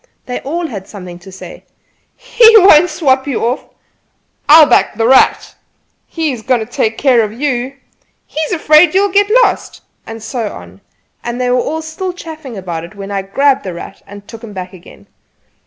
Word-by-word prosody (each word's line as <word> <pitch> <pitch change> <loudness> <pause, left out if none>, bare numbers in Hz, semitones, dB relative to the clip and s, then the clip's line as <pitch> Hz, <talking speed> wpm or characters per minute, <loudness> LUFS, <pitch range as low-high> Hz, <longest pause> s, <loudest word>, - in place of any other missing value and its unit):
They 250 - -5
all 335 +5 -4
had 200 - -7
something 180 -4 -10
to 190 +2 -14
say: 190 - -12 0.5
"He 460 -2 +5
won't 355 -4 +6
swap 265 -4 0
you 265 -4 -2
off!" 245 +4 -3 0.8
"I'll 310 +1 +9
back 295 - +2
'The 225 +1 0
Rat'!" 260 +1 +3 0.5
"He 320 -3 -2
is 245 -4 -7
going 250 +1 0
to 220 - -4
take 225 -1 -2
care 255 -4 +3
of 215 -2 -2
you!" 260 -2 -2 0.5
"He - - -7
is 315 - -2
afraid 310 0 +4
you'll 400 0 +2
get 405 0 +3
lost!" - - -3 0.2
and 225 -1 -9
so 225 -3 -4
on; 90 +2 -13 0.4
and 240 +1 -5
they 250 0 0
were 290 +6 -1
still 355 +4 -5
chaffing 315 - -10
about 175 -4 -6
it 175 +5 -12
when 200 0 -8
I 200 -1 -2
grabbed 275 +8 0
"The 185 -3 -6
Rat" 180 - -10
and 200 0 -13
took 225 0 -12
him 215 -3 -10
back 185 -1 -7
again. 180 -1 -16
250 Hz, 190 wpm, -14 LUFS, 205-310 Hz, 0.8 s, I'll